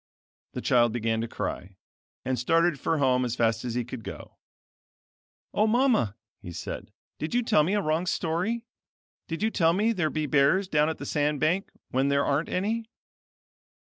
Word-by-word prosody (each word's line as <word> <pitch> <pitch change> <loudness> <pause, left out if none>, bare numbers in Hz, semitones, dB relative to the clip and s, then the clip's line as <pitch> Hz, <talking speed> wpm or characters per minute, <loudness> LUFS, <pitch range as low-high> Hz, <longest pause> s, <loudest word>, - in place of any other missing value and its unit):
The - - -4
child 120 -2 +3
began 115 -1 0
to 115 - -3
cry, 95 -3 -5 0.5
and 130 -2 -1
started 165 +4 +2
for 165 - 0
home 130 -3 +3
as 120 -1 -2
fast 115 -2 +1
as 120 -2 -3
he 125 -1 -1
could 125 -1 -7
go. - - -9 1.1
"O 215 - +3
Mama!" 225 - +2 0.3
he 90 - -8
said, - - -6 0.3
"Did 155 +9 -3
you 245 - +3
tell 220 -8 +4
me 185 +7 +1
a 205 - +2
wrong 160 +4 0
story? 185 +10 -1 0.6
Did 165 +5 -4
you 220 - +2
tell 165 -6 +3
me 210 +5 +2
there 175 -7 0
be 155 0 -2
bears 150 +7 +3
down 150 -2 +2
at 160 - -3
the - - -7
sand 150 -1 0
bank 180 +7 +1 0.2
when 130 +2 +2
there 140 0 +2
aren't 145 +4 0
any?" 220 +4 -1
155 Hz, 180 wpm, -27 LUFS, 125-190 Hz, 1.1 s, tell